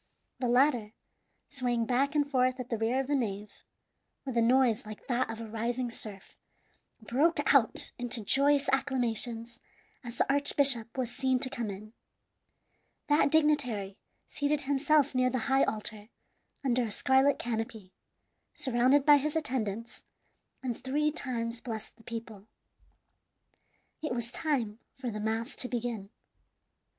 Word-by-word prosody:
The 250 - 0
latter, 245 -3 +3 0.5
swaying 245 -4 0
back 275 +5 +1
and 290 -1 +2
forth 255 -2 +1
at 250 0 -6
the 230 - 0
rear 230 +4 +1
of - - -5
the 290 - -1
nave, 210 -5 -2 0.7
with 260 -3 -4
a 235 - +4
noise 245 0 +3
like 215 -2 -10
that 250 -1 0
of 225 0 -5
a 230 - -6
rising 235 +3 -2
surf, 205 -4 -9 0.7
broke 290 +7 +2
out 255 -6 +3
into 245 -2 -1
joyous 280 +4 +3
acclamations 240 -3 -1 0.4
as 240 -1 -8
the - - +3
archbishop 275 -4 +1
was 245 -2 -2
seen 260 -1 +2
to 260 - +2
come 235 -5 -3
in. 210 +3 -8 1.2
That 295 0 +4
dignitary 265 -11 +2 0.3
seated 290 0 -1
himself 285 +1 +2
near 255 0 +3
the 255 - -1
high 270 0 +5
altar 215 0 -4 0.6
under 250 -1 +2
a 235 - -1
scarlet 265 +6 +3
canopy, 225 -4 -4 0.6
surrounded 260 +3 +3
by 295 -1 +8
his 295 +2 -2
attendants, 230 -7 -2 0.6
and 245 -3 -2
three 295 +3 +1
times 240 -6 -3
blessed 220 -3 -6
the 225 - -20
people. 225 -3 -8 1.5
It 305 -6 -2
was 235 0 -4
time 245 -8 -1 0.2
for 255 -3 -4
the 215 - -5
mass 225 +3 -2
to 250 - -3
begin. 235 -5 -3
245 Hz, 140 wpm, -30 LUFS, 225-275 Hz, 1.5 s, by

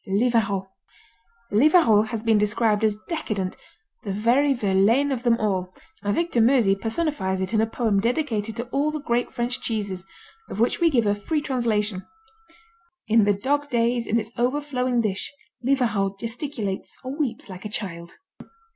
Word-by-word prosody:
Livarot 200 -2 +1 0.8
Livarot 225 - +5
has 220 -1 -4
been 225 -2 +3
described 210 +1 +1
as 215 -1 +2
decadent, 215 - -3 0.5
"The 210 -5 -4
very 240 +8 +3
Verlaine 230 +4 +2
of 255 -3 -1
them 240 -2 +3
all," 185 -4 -2 0.3
and 205 0 0
Victor 335 -8 +1
Meusy 230 -4 +4
personifies 220 - -1
it 190 +3 -2
in 220 - +3
a 225 - +1
poem 225 -3 0
dedicated 230 -2 -1
to 235 - -2
all 280 +3 +1
the 305 0 -3
great 240 -4 -1
French 240 +1 -2
cheeses, 200 -5 -3 0.5
of - - -6
which 235 - +2
we 340 -1 +4
give 240 -7 +2
a 205 - +3
free 250 +10 -1
translation: 220 -8 -1 1.0
In 220 -1 +4
the 205 - +4
dog 285 +7 -1
days 235 -1 +1
In 230 - +2
its 220 0 -6
overflowing 255 -1 0
dish 205 -3 -2 0.3
Livarot 225 -7 +1
gesticulates 230 -4 -4
Or 260 +2 -5
weeps 275 -7 -3
like 185 -2 -9
a 210 - -5
child. 170 -5 -5
225 Hz, 160 wpm, -24 LUFS, 205-255 Hz, 1.0 s, Livarot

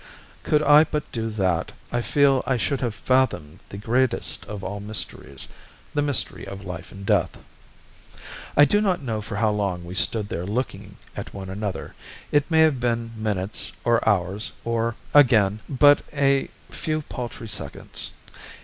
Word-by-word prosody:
Could 150 0 +2
I 150 +1 +8
but 150 -1 -2
do 115 -1 -2
that, 95 -6 0 0.2
I 120 - 0
feel 140 +1 +3
I 130 - +2
should 135 +3 -1
have 120 -4 -1
fathomed 115 - +1
the 100 - -7
greatest 120 +5 0
of 105 -2 -6
all 100 +2 -4
mysteries 100 -10 -3 0.5
the 145 - +1
mystery 145 -4 -1
of 100 0 -8
life 90 -2 -7
and 95 0 -9
death. - - +1 1.2
"I 145 - +9
do 205 +7 +2
not 185 -7 +1
know 110 -4 -2
for 105 0 -6
how 110 +1 +2
long 100 -4 -2
we 85 - -7
stood 105 +2 +1
there 90 -1 -4
looking 100 -3 -4 0.2
at - - -7
one 95 -1 -6
another, 100 0 -4 0.4
it 145 +1 +2
may 160 -1 +5
have 155 -5 +4
been 115 -1 -1
minutes 105 -2 -3
or 120 -1 +3
hours, 100 +1 0
or, 115 0 0 0.2
again, 110 -8 +5
but 145 +2 +6
a 140 -2 +2 0.2
few 155 -1 -2
paltry 120 -4 -6
seconds. - - -3
115 Hz, 160 wpm, -24 LUFS, 100-135 Hz, 1.2 s, I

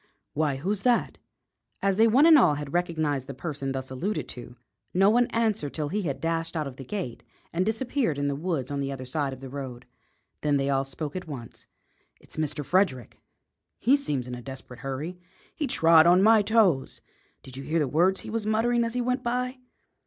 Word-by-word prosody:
"Why, 150 -2 0
who's 190 +9 -2
that?" 245 0 +1 0.6
As 195 -1 +1
they 225 +1 +6
one 260 +7 +5
and 330 -1 +8
all 195 - +5
had 145 -1 -6
recognised 155 -6 -1
the 140 - -7
person 135 -1 -4
thus 130 0 -5
alluded 155 - -2
to, 120 0 -9 0.4
no 195 +3 +5
one 240 +1 +3
answered 215 -11 -1
till 150 -2 -2
he 210 +5 -1
had 150 -8 -3
dashed 165 0 -2
out 155 - -1
of 135 -2 -8
the 135 - -7
gate 135 - -5 0.3
and 175 +2 +1
disappeared 225 - -1
in 145 0 0
the 140 - -1
woods 150 -4 -2
on 140 - -2
the 140 0 -2
other 130 -1 -6
side 140 +1 -1
of 130 0 -9
the 135 - -7
road. 130 -2 -7 0.6
Then 145 -1 +2
they 140 0 0
all 135 0 +1
spoke 145 +3 -5
at 180 -2 -5
once. 125 -7 -9 0.5
"It's - - -9
Mr. 150 -1 -1
Frederick!" 145 - 0 0.6
"He 255 +5 +4
seems 145 - -2
in 125 - -7
a 125 - -6
desperate 130 -1 -9
hurry." 145 +7 -5 0.4
"He 295 - -2
trod 165 -7 +5
on 180 +2 +6
my 220 0 +6
toes." 205 -10 +2 0.4
"Did 130 - -11
you 135 - -6
hear 155 +5 -1
the 150 -3 +2
words 175 +8 +2
he - - -8
was 225 -1 -1
muttering 235 +2 +2
as 230 +1 -3
he 250 - +1
went 250 +1 0
by?" 250 +2 -2
155 Hz, 210 wpm, -27 LUFS, 135-210 Hz, 0.6 s, and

